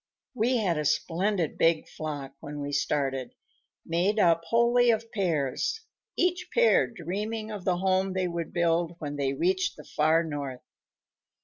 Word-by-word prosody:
"We 250 +1 +1
had 180 -8 0
a 150 - -2
splendid 170 +3 0
big 165 -1 +3
flock 145 -3 -6
when 145 +1 -7
we 145 0 -4
started, 135 -2 -1 0.5
made 180 +6 +1
up 170 -5 +4
wholly 235 +4 +4
of 230 0 +1
pairs, 170 - -1 0.4
each 360 0 0
pair 475 0 +4
dreaming 215 +3 -4
of 200 -4 -7
the 180 -2 +2
home 190 +1 +1
they 185 -1 0
would 170 -1 -4
build 170 -1 +1
when 145 -3 -5
they 135 -1 0
reached 185 +5 0
the - - -10
far 155 +2 +2
North. 145 -5 -5
175 Hz, 150 wpm, -28 LUFS, 150-210 Hz, 0.5 s, up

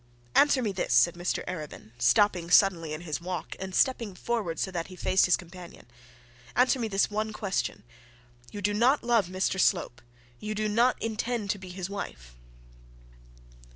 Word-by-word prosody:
'Answer 285 -3 +4
me 210 - 0
this,' 180 -10 -1
said 125 +8 +5
Mr 175 0 -3
Arabin, 155 -10 -7
stopping 170 - +3
suddenly 175 -4 +4
in 155 +1 -5
his 165 -2 -4
walk, 180 -1 -5
and 190 -1 -5
stepping 230 -7 +1
forward 205 -6 -2
so 190 - -2
that 170 -2 -4
he 185 - -11
faced 185 +1 +2
his 180 - +3
companion. 175 0 -12 0.7
'Answer 255 +1 +3
me 230 - -1
this 195 -2 +2 0.3
question. 190 - -3 0.7
You 205 -1 -7
do 205 +2 +1
not 245 +7 +3
love 235 -6 +2
Mr 185 +1 -1
Slope? 170 -11 +1 0.4
You 215 0 -4
do 215 0 -1
not 235 +4 +2
intend 225 -1 -2
to 205 - -4
be 185 -1 -10
his 180 0 -5
wife?' - - -7
190 Hz, 165 wpm, -28 LUFS, 175-215 Hz, 0.7 s, said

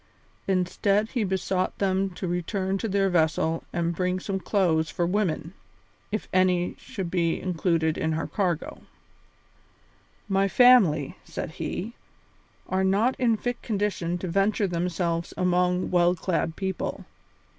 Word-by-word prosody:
Instead, 195 +3 +1
he 240 -5 0
besought 190 -1 -1
them 195 0 +1
to 185 0 -6
return 185 +2 -1
to 210 +3 -2
their 195 -1 +2
vessel 165 -2 +1
and 170 0 -1
bring 180 +1 0
back 185 - -6
some 195 -1 -1
clothes 170 -6 +1
for 175 - -1
women, 180 -3 -1 0.6
if 215 - -3
any 180 -1 +3
such - - -18
should 185 -3 -5
be 170 -2 +1
included 165 -3 0
in 160 0 0
her 160 - -2
cargo. 180 -6 -2 1.5
"My 195 0 +2
family," 195 - +5
said - - -6
he, 200 +6 -4 0.7
"are 190 0 0
not 205 +7 +2
in 235 -3 +3
fit 245 +2 -3
condition 200 -5 -1
to 180 - -5
venture 195 +4 +1
themselves 170 -1 -2
among 180 0 +1
well 175 0 +4
clad 165 -2 -1
people. 190 -2 -3
185 Hz, 140 wpm, -26 LUFS, 170-195 Hz, 1.5 s, family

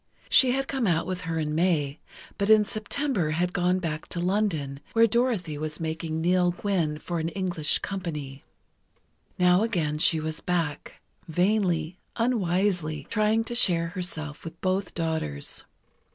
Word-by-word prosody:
She 255 -2 +6
had 270 +1 -1
come 265 -5 0
out 165 -2 +2
with 185 -1 -3
her 165 - -1
in 150 -1 -1
May, 155 -4 +1 0.4
but 200 +1 +1
in 215 -1 +7
September 215 - -1
had 180 +1 0
gone 180 0 +2
back 160 -4 -4
to 170 - -4
London, 175 -7 0
where 230 0 +6
Dorothy 220 - 0
was 155 0 -4
making 160 0 -3
"Nell 180 +1 +3
Gwynn" 175 -4 -1
for 170 +2 -4
an 160 +1 -1
English 175 -4 0
company. 150 -8 -5 0.9
Now 180 +1 +5
again 165 -10 0
she 160 +1 +4
was 155 0 -3
back, 165 -5 -2 0.3
vainly, 180 -1 +1 0.2
unwisely 180 - 0
trying 220 0 +2
to 240 - -5
share 170 -8 +2
herself 160 -5 -5
with 165 0 -9
both 185 +1 -1
daughters. 160 - -3
175 Hz, 150 wpm, -27 LUFS, 160-200 Hz, 0.9 s, in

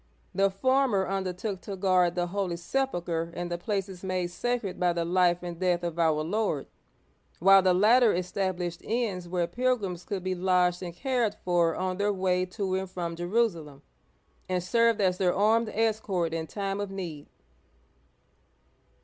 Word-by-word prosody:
The 195 0 +3
former 240 -1 +1
undertook 190 +1 -3
to 200 - -6
guard 185 -2 +2
the 175 -1 0
Holy 180 -1 -2
Sepulcher 175 -6 -2
and 175 0 -4
the 175 - -1
places 195 -1 -3
made 185 -2 -2
sacred 235 -1 -2
by 180 -1 +2
the 170 -1 -1
life 180 0 +2
and 175 -1 -6
death 180 -2 +1
of 170 -1 -3
our 155 -2 +2
Lord, 185 -4 -1 0.7
while 195 +2 +7
the 185 -1 +3
latter 225 +4 +5
established 180 -1 -2
inns 215 -6 -2
where 175 -1 0
pilgrims 200 -3 -1
could 195 -3 -4
be 185 0 -1
lodged 180 -1 +2
and 175 -2 -6
cared 240 -2 0
for 175 -2 +2
on 185 0 -2
their 205 +1 +1
way 185 -1 0
to 185 +1 -3
and 190 0 -2
from 170 -2 -4
Jerusalem, 175 -6 -1 0.7
and 180 -1 0
served 230 +4 +3
as 185 -2 +1
their 180 -2 +2
armed 220 +3 +3
escort 210 -6 0
in 160 -1 -3
time 195 +1 -3
of 205 - -3
need. 175 -7 -6
185 Hz, 160 wpm, -28 LUFS, 175-205 Hz, 0.7 s, while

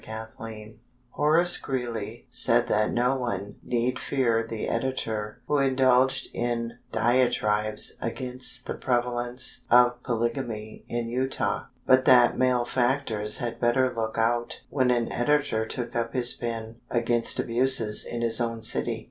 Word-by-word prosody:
WISHING 110 -1 -9 0.3
Horace 165 +4 +3
Greeley 120 -5 -4
said - - +4
that 105 0 +2
no 125 +2 +1
one 105 -6 -4
need 120 +1 -1
fear 120 -5 +1
the 115 -1 -5
editor 115 -4 -3
who 150 - +2
indulged 130 -1 +2
in 120 0 -3
diatribes 110 -3 +1
against 125 +2 -2
the - - -3
prevalence 120 0 -1
of 125 0 +5
polygamy 115 -2 -3
in 120 -1 -2
Utah, 130 +3 -1 0.2
but 130 0 +4
that 125 -1 +6
malefactors 125 -3 0
had 120 -1 -5
better 125 +1 +2
look 110 -1 -3
out 120 +1 0
when 130 -3 +2
an 120 -2 +1
editor 140 -4 +1
took 120 -1 -5
up 115 -1 -1
his 125 -1 +2
pen 115 -1 -5
against 120 -1 +1
abuses 115 -3 +2
in 120 - -5
his 115 +1 +1
own 115 -1 -2
city. - - -1
120 Hz, 130 wpm, -26 LUFS, 115-130 Hz, 0.3 s, that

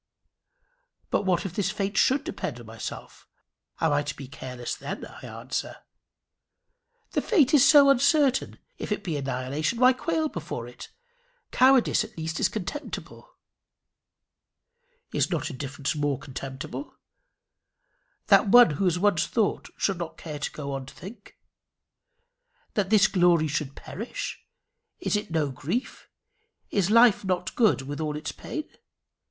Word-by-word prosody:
"But 200 - 0
what 180 0 +1
if 185 - -4
this 195 -1 0
fate 200 0 -2
should 265 +2 +3
depend 125 -4 -5
on 120 - -11
myself? 110 0 -8 0.5
Am 160 - +2
I 145 - +2
to 145 0 -5
be 135 - -9
careless 125 -2 -6
then?" - - -6
I - - -13
answer. - - -5 1.4
"The - - 0
fate 315 - +3
is 285 0 +7
so 290 -3 +8
uncertain! 275 0 +2 0.2
If - - -5
it 210 - -1
be 170 -6 -2
annihilation, 140 - -2
why 255 +1 +6
quail 320 +4 -1
before 160 - -6
it? 120 - -11 0.6
Cowardice 260 -1 +4
at - - -12
least 160 0 -3
is - - +3
contemptible." 225 +9 -6 1.8
"Is - - +1
not - - -2
indifference 140 +2 -4
more 145 -2 0
contemptible? 135 - -7 1.3
That - - +5
one 240 -3 +8
who 150 +7 -1
has 180 -1 +2
once 195 -3 +2
thought 220 -4 0
should 195 -3 0
not 170 -2 -5
care 150 -3 -7
to 150 - -3
go 140 -2 -6
on 135 -1 -5
to - - -12
think? 200 +7 -12 1.4
That 200 -3 0
this 215 -1 +6
glory 175 -5 +3
should 145 -2 -3
perish 240 - -6 0.6
is 345 - 0
it 210 -3 -2
no 155 -4 0
grief? 170 - -4 0.6
Is 195 -2 +1
life 230 -1 +6
not 185 -2 -1
a - - -25
good 215 - +3
with 145 +3 -5
all 150 -1 -2
its 155 +1 -4
pain? 310 -1 -6
175 Hz, 145 wpm, -26 LUFS, 145-230 Hz, 1.8 s, so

